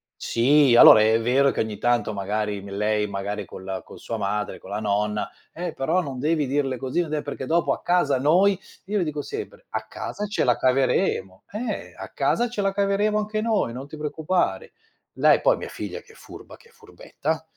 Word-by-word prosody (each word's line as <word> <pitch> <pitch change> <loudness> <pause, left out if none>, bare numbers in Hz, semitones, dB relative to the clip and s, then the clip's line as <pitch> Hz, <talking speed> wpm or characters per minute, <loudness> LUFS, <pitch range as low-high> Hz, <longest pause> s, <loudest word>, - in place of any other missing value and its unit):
Sì, 135 +1 +3
allora 110 - +10
è 110 +1 +4
vero 130 +4 +3
che - - -5
ogni 110 -2 -2
tanto 120 -3 +1
magari 105 +1 -2
m 100 - -10
lei 105 +1 0
magari 100 +1 -4
con 95 - -11
la 95 -1 -4
con - - -13
sua 115 - -5
madre, 105 +1 -3
con 95 - -13
la 105 +1 -3
nonna: 105 0 -1 0.2
"Eh, 175 0 -5
però 135 +7 0
non 135 -5 -6
devi 155 +1 +1
dirle 135 -2 -1
così, 130 +8 -1
non 155 -2 -4
è 150 - -1
perché 140 -2 -5
dopo 170 +1 +2
a - - -7
casa 150 -7 +2
noi" 180 +7 +4 0.3
io 205 +1 -1
le - - +1
dico 150 -2 -3
sempre: 430 - -7
"A - - -4
casa 210 - -5
ce 205 - -1
la 125 - +4
caveremo. 130 - 0
Eh, 225 +4 -4
a - - -7
casa 240 +1 0
ce 220 -3 -3
la 195 0 +1
caveremo 200 +2 +1
anche 215 0 -2
noi, 215 - 0
non 135 +3 -7
ti 155 - -10
preoccupare." 160 - -1 0.4
Lei - - +4
poi, - - +3
mia - - -6
figlia - - -6
che 450 - -19
è - - -20
furba, - - -12
che 465 - -22
è - - -24
furbetta, 460 +2 -5
140 Hz, 210 wpm, -24 LUFS, -, 0.4 s, allora